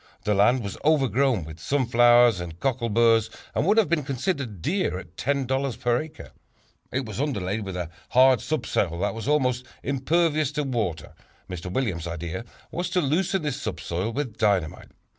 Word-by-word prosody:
The 105 Hz, -, +1 dB
land 110 Hz, +5 st, +3 dB
was 100 Hz, -2 st, -6 dB
overgrown 135 Hz, -, +2 dB
with 80 Hz, 0 st, -10 dB
sunflowers 120 Hz, -, +4 dB
and 85 Hz, -1 st, -7 dB
cockleburs 115 Hz, -3 st, +2 dB, 0.2 s
and 155 Hz, -, 0 dB
would 210 Hz, +3 st, +4 dB
have 225 Hz, -, +5 dB
been 165 Hz, 0 st, +1 dB
considered 130 Hz, -, -3 dB
dear 180 Hz, -, -1 dB
at 90 Hz, -2 st, -11 dB
$10 135 Hz, 0 st, -1 dB
per 120 Hz, 0 st, +1 dB
acre. 155 Hz, 0 st, -10 dB, 0.6 s
It 130 Hz, +1 st, -1 dB
was 110 Hz, +4 st, -4 dB
underlaid 105 Hz, -7 st, -2 dB
with 95 Hz, -2 st, -6 dB
a 85 Hz, -2 st, -4 dB, 0.2 s
hard 130 Hz, -2 st, +5 dB
subsoil 100 Hz, -, -1 dB
that 100 Hz, -, 0 dB
was 115 Hz, +2 st, -6 dB
almost 130 Hz, -4 st, +1 dB, 0.2 s
impervious 155 Hz, +2 st, +1 dB
to 150 Hz, +1 st, -1 dB
water. 115 Hz, -, -3 dB, 0.3 s
Mr. 90 Hz, 0 st, -6 dB
Williams' 95 Hz, -9 st, -1 dB
idea 85 Hz, +5 st, -5 dB, 0.3 s
was 175 Hz, +1 st, -2 dB
to 180 Hz, +1 st, +1 dB
loosen 175 Hz, +4 st, 0 dB
this 145 Hz, -2 st, -3 dB
subsoil 95 Hz, -2 st, -3 dB
with 125 Hz, -4 st, -4 dB
dynamite. 100 Hz, -7 st, 0 dB
120 Hz, 160 wpm, -25 LUFS, 100-140 Hz, 0.6 s, have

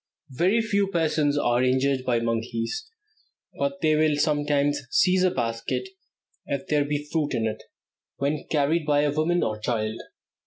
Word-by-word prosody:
Very 185 Hz, -, +2 dB
few 200 Hz, -2 st, +1 dB
persons 155 Hz, -5 st, +1 dB
are 120 Hz, -3 st, +2 dB
injured 130 Hz, +1 st, +1 dB
by 120 Hz, -2 st, +2 dB
monkeys, 115 Hz, -, -2 dB, 0.7 s
but 280 Hz, 0 st, -2 dB
they 155 Hz, -, +3 dB
will 155 Hz, -1 st, +3 dB
sometimes 145 Hz, -1 st, +1 dB
seize 185 Hz, +5 st, +3 dB
a 185 Hz, -, +4 dB
basket, 115 Hz, -, -3 dB, 0.6 s
if 140 Hz, -1 st, -3 dB
there 150 Hz, -1 st, +3 dB
be 145 Hz, 0 st, -3 dB
fruit 155 Hz, -3 st, 0 dB
in 115 Hz, -, 0 dB
it, 110 Hz, 0 st, -3 dB, 0.6 s
when 145 Hz, +2 st, -2 dB
carried 150 Hz, +1 st, +1 dB
by 145 Hz, -1 st, +3 dB
a 145 Hz, -1 st, +1 dB
woman 160 Hz, +4 st, +1 dB
or 110 Hz, 0 st, -2 dB
child. 110 Hz, 0 st, -2 dB
145 Hz, 155 wpm, -25 LUFS, 125-160 Hz, 0.7 s, a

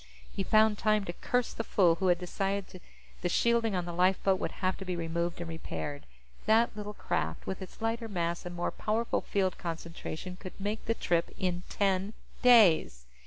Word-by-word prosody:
He -, -, -1 dB
found 215 Hz, +1 st, +4 dB
time 215 Hz, -2 st, +2 dB
to 175 Hz, -, -4 dB
curse 245 Hz, +6 st, -1 dB
the 225 Hz, -, -3 dB
fool 180 Hz, -6 st, +4 dB
who 190 Hz, -, +2 dB
had 175 Hz, -1 st, +4 dB
decided 195 Hz, +1 st, -3 dB, 0.4 s
the 175 Hz, -, 0 dB
shielding 230 Hz, +1 st, +2 dB
on 180 Hz, -1 st, -1 dB
the 175 Hz, -, -5 dB
lifeboat 185 Hz, +2 st, +2 dB
would -, -, -3 dB
have 185 Hz, 0 st, -1 dB
to -, -, -7 dB
be 180 Hz, -1 st, -3 dB
removed 170 Hz, +1 st, -2 dB
and 170 Hz, -, -4 dB
repaired. 150 Hz, -3 st, -5 dB, 0.4 s
That 225 Hz, +2 st, +4 dB
little 210 Hz, 0 st, -6 dB
craft, 80 Hz, 0 st, -2 dB
with 190 Hz, -, -4 dB
its 190 Hz, +4 st, -9 dB
lighter 225 Hz, +1 st, -1 dB
mass 170 Hz, -4 st, -2 dB
and 175 Hz, 0 st, -6 dB
more 175 Hz, -, -1 dB
powerful 225 Hz, +2 st, -1 dB
field 190 Hz, -2 st, -1 dB
concentration, 170 Hz, +1 st, -6 dB
could 185 Hz, 0 st, -10 dB
make 205 Hz, +3 st, -3 dB
the 230 Hz, -, 0 dB
trip 170 Hz, -5 st, 0 dB
in 180 Hz, -1 st, -1 dB
ten 195 Hz, +1 st, 0 dB, 0.3 s
days. 190 Hz, -, +5 dB
185 Hz, 185 wpm, -30 LUFS, 175-215 Hz, 0.4 s, days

